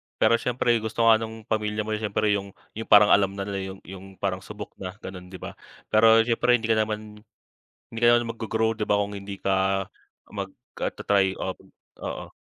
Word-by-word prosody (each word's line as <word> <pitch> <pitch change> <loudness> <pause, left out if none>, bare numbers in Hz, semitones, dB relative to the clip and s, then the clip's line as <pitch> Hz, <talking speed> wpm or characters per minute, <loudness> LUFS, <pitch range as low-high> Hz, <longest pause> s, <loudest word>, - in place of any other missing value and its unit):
pero 115 +1 +3
siyempre 120 -1 +1
gusto 110 +1 -2
nga 115 -1 +6
nung 110 0 -7
pamilya 105 -1 -1
mo 110 - -5
siyempre 105 0 0
yung 100 -1 -2 0.2
yung 115 - -5
parang 105 0 +7
alam 100 -1 +4
na 100 - -3
nila 100 -1 -4 0.2
yung - - -17
yung 95 +1 -10
parang 95 -1 -2
subok 105 +2 -9
na, 95 0 -6
ganon, 90 -1 -8
'di 95 - -11
ba? - - -7 0.4
Pero 110 +1 +6
siyempre 120 +1 +3
hindi 115 -1 -1
ka 110 - +3
naman 105 0 -3 0.7
hindi 115 - -6
ka 120 - +5
naman 120 -1 +2
maggro-grow, 110 0 -1
'di 105 - -1
ba, 105 0 +2
kung 100 0 -4
hindi 100 0 -8
ka 95 0 +1 0.4
mag, - - -5 0.3
ah, - - -1
tra-try, 95 -2 +1
o 95 - -3 0.5
oo. - - -6
105 Hz, 200 wpm, -25 LUFS, 100-110 Hz, 0.7 s, parang